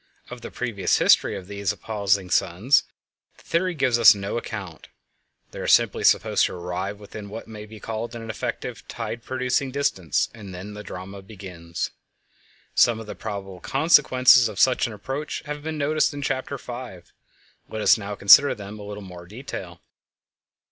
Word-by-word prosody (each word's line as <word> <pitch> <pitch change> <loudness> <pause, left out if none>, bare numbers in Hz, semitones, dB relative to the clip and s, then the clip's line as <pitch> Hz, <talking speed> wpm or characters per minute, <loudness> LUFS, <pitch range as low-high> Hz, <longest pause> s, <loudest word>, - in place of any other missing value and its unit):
Of 125 -1 -8
the - - -7
previous 115 -6 0
history - - +4
of 95 - -9
these 100 0 -2
appulsing 100 -3 -1
suns 95 +9 +3 0.5
the - - -20
theory 175 +1 0
gives 130 -5 +2
us 115 -1 +9
no 100 0 -4
account; 105 -8 -6 0.6
they - - -9
are - - -4
simply - - +3
supposed - - +4
to - - -7
arrive 90 +3 -4
within 105 0 -9
what 110 +3 -8
may 105 -1 -9
be 110 0 -12
called 115 +2 -5
an 115 -1 -7
effective 110 - -5
tide 115 - -5
producing 130 +1 -1
distance, 130 - 0
and 100 -5 -10
then 100 +3 -8
the 105 - -8
drama 95 0 -8
begins. 90 -4 -6 0.8
Some 115 -2 +4
of 110 - -8
the 105 - -7
probable 100 -4 -7
consequences 130 - +5
of 105 -2 -7
such 130 -2 +4
an 115 - -7
approach 135 +8 -5
have 150 0 -5
been 155 +1 -4
noticed 150 0 +1
in 145 - -5
Chapter 135 +1 -2
5; 120 -8 -9 0.6
let 110 -1 -4
us - - +7
now 105 -1 -5
consider 100 +9 +7
them 105 0 -9
a - - -8
little 105 0 -7
more 90 -2 -10
in - - -20
detail. 95 -7 -8
105 Hz, 175 wpm, -24 LUFS, 95-125 Hz, 0.8 s, us